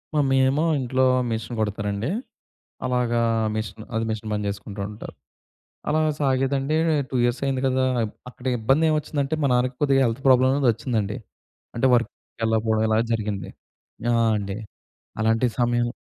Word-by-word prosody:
Mummy 135 -3 +3
ఏమో 140 +4 +1 0.2
ఇంట్లో 130 0 +1 0.3
machine 115 +2 -3
కుడతారండి. 105 +1 -2 0.8
అలాగా 125 -2 +1 0.3
మెషిన్, 110 0 -5
అదే 110 - 0
మిషన్ 110 0 -5
పని 105 0 -2
చేసుకుంటా 100 0 -5
ఉంటారు. 105 - -9 0.8
అలాగ 155 +1 +2
సాగేదండి 135 +1 +1 0.3
2 - - -7
ఇయర్స్ 120 +1 +1
అయింది 135 -1 0
కదా! 130 0 +2 0.4
అక్కడ 125 0 -14
ఇబ్బందేమొచ్చిందంటే 150 +3 +1
మా - - +3
నాన్నకి 125 +1 +1
కొద్దిగా 135 -2 +4
హెల్త్ 115 +1 -1
ప్రాబ్లమ్ 130 0 +6
అనేదొచ్చిందండి. 115 -5 0 0.6
అంటే 120 - +2
వర్క్‌కెళ్ళకపోవడం 110 -2 0
ఇలా 110 0 +3
జరిగింది. 105 -3 -2 0.6
ఆ! - - +2 0.2
అండి. 100 0 -4 0.6
అలాంటి 115 +2 +2
సమయం 120 0 +2
120 Hz, 125 wpm, -24 LUFS, 110-135 Hz, 0.8 s, ప్రాబ్లమ్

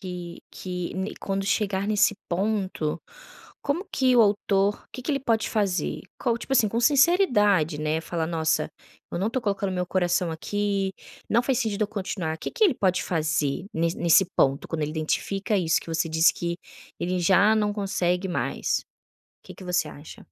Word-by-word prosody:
que 180 -2 -7
que 180 -2 -5
n 190 +2 -3
quando 195 0 -2
chegar 200 -1 0
nesse 210 0 +3
ponto, 190 -4 -1 0.6
como 290 +7 -1
que 255 -2 +3
o 235 - +8
autor 205 -1 +2
o - - -60
que 255 - -7
que 275 - -2
ele 275 - 0
pode 225 -4 0
fazer? 195 -7 -1 0.2
Qual, 235 -3 +1
tipo 270 - -6
assim, 230 -5 +4
sinceridade, 235 - +4
né, 155 +1 0
falar: 165 0 -3
"Nossa, 160 -2 0 0.4
eu - - -2
não 190 - 0
estou 250 +1 -2
colocando 200 -2 -1
meu 180 -1 -2
coração 175 -1 +1
aqui, 195 +3 -1 0.4
não 235 +2 +3
faz 260 -1 +1
sentido 220 -5 -1
eu 210 - 0
continuar". 185 -6 -3
Que - - -5
que 460 - +2
ele 355 -10 +4
pode 185 -5 +1
fazer 155 -1 -1
ne 165 +1 +1
nesse 170 +3 +4
ponto, 135 0 +2
quando 160 -2 -2
ele 150 - -1
identifica 195 +7 -1
isso 170 -3 +2
que - - -14
você 165 0 0
disse 160 +2 +4
que 170 0 -3 0.4
ele 180 +1 -1
já 195 +5 +5
não 210 -1 +1
consegue 190 -2 -1
mais? 180 - -1 0.6
Que - - -11
que 190 - -12
você 180 0 0
acha? 145 +2 -12
190 Hz, 180 wpm, -25 LUFS, 170-210 Hz, 0.6 s, o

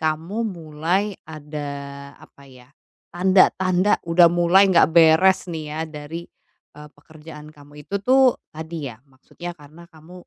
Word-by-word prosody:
kamu 160 +5 -3
mulai 165 +2 -2 0.2
ada, 150 -1 -8 0.6
apa 140 - -19
ya, 125 -1 -17 0.5
tanda-tanda 185 +1 +2
udah 170 0 +6
mulai 175 +3 +4
enggak 170 -5 +4
beres 165 +4 +5
nih 160 -1 -5
ya 155 - -6
dari, 155 +3 -8 0.5
eee, 150 0 -12
pekerjaan 150 0 -14
kamu 145 -1 -18
itu - - -7
tuh 260 +1 +4 0.2
tadi 160 -2 -7
ya 115 - -11
maksudnya 170 +6 -10
karena 155 +3 -16
kamu 160 +2 -17
160 Hz, 135 wpm, -21 LUFS, 150-180 Hz, 0.6 s, udah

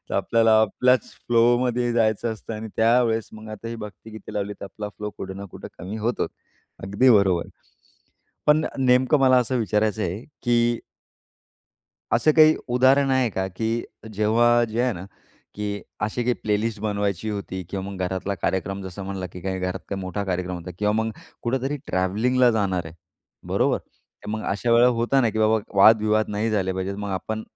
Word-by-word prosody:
तर - - -3
आपल्याला 115 -1 +3
आपल्याच 125 +4 +2 0.2
फ्लोमध्ये 120 +1 +3
जायचं 115 0 +1
असतं 110 +1 -8
आणि 110 +1 -6
त्यावेळेस 115 -1 +2
मग 110 0 -10
आता 110 +2 -7
ही 115 - -5
भक्तिगीते 110 0 -10
लावली 100 0 -2
तर - - -5
आपला 105 +1 -7
फ्लो 105 0 -4
कुठं 95 0 -6
ना 100 - -7
कुठं - - -9
कमी 95 +4 -6
होतो. 115 +3 -1 0.6
अगदी 100 +7 +3
बरोबर. 95 -6 +4 1.0
पण 150 +1 +4
नेमकं 130 +3 +4
मला 130 -1 +5
असं 125 +1 0
विचारायचं 110 -1 0
आहे, 95 +6 -3 0.2
की 120 -1 +2 1.3
असं 155 - +4
काही 155 0 +7
उदाहरण 130 +3 +4
आहे 130 -2 +3
का, 95 -1 -2
की 110 +5 -2 0.3
जेव्हा 120 +3 +3
जे 110 +2 -2
आहे 125 -1 +1
ना, 90 -3 -7 0.5
की 100 -1 -4 0.2
अशी 110 +3 -1
काही 125 0 +2
प्लेलिस्ट 105 0 -2
बनवायची 100 -1 -2
होती 100 -3 -4
किंवा 95 -1 -4
मग 95 - -8
घरातला 95 +2 -2
कार्यक्रम 95 +2 -1
जसं 95 +1 -7
म्हणला 95 -1 -4
की 90 - -8
काही 95 0 -2
घरात 90 0 -3
काही 100 -1 -3
मोठा 95 +2 -3
कार्यक्रम 90 -1 -2
होता 85 +1 -8
किंवा 105 0 +1
मग 110 +1 0 0.3
कुठेतरी 135 +4 -1
ट्रॅव्हलिंगला 115 +7 +2
जाणार 95 -6 0
आहे. 80 - -10 0.5
बरोबर, - - +1 0.5
मग 110 +1 -3
अशा 100 +4 -1
वेळेला 120 +1 +6
होत 120 +3 -2
ना, 120 - +3
की 110 - -4
बाबा 110 0 +3 0.2
वादविवाद 110 +1 +5
नाही 105 +2 -1
झाले 95 -3 0
पाहिजेत 95 +1 -3
मग 100 - -4
आपण, 110 +4 -3
110 Hz, 170 wpm, -24 LUFS, 100-120 Hz, 1.3 s, काही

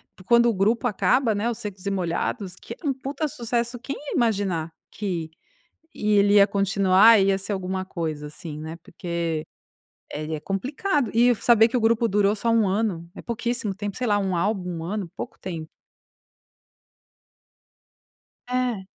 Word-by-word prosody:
porque 185 - -17
quando 235 0 +5
o 230 - +1
grupo 220 +6 +1
acaba 240 +2 +2
né, 210 +4 0
os 235 - -4
Secos 200 -2 -7
e 200 - 0
Molhados, 185 +2 -2
que 230 - -9
é - - -15
um - - +3
puta 275 +3 -3
sucesso, 240 -3 -2
quem 275 +2 -5
ia 290 - -7
imaginar 195 - 0 0.2
que 175 -6 -3 0.7
ia 210 0 +2
ele 200 0 +4
ia 200 -1 +8
continuar, 200 +2 +5
ia 195 0 +3
ser 195 +2 -4
alguma 190 -1 -2
coisa 160 -5 -4
assim, 150 0 -8
né. 160 +2 -6
Porque 170 -3 -3 0.7
ele 155 +1 -4
é 150 - -4
complicado 265 - -1
e 240 +2 +5
saber 225 0 +5
que 240 - -1
o - - +2
grupo 230 +1 +3
durou 205 0 +2
só 230 +3 -2
1 225 -3 +3
ano, 190 -4 -1
é - - -8
pouquíssimo 235 -2 -2
tempo, 205 0 -5
sei 250 - -2
lá, 205 -1 +3
1 190 -2 -1
álbum, 180 -2 -1
1 165 - -6
ano, 195 -1 -4
pouco - - -6
tempo. 165 -4 -6 2.8
É. 250 -6 -1
200 Hz, 170 wpm, -24 LUFS, 185-235 Hz, 2.8 s, ia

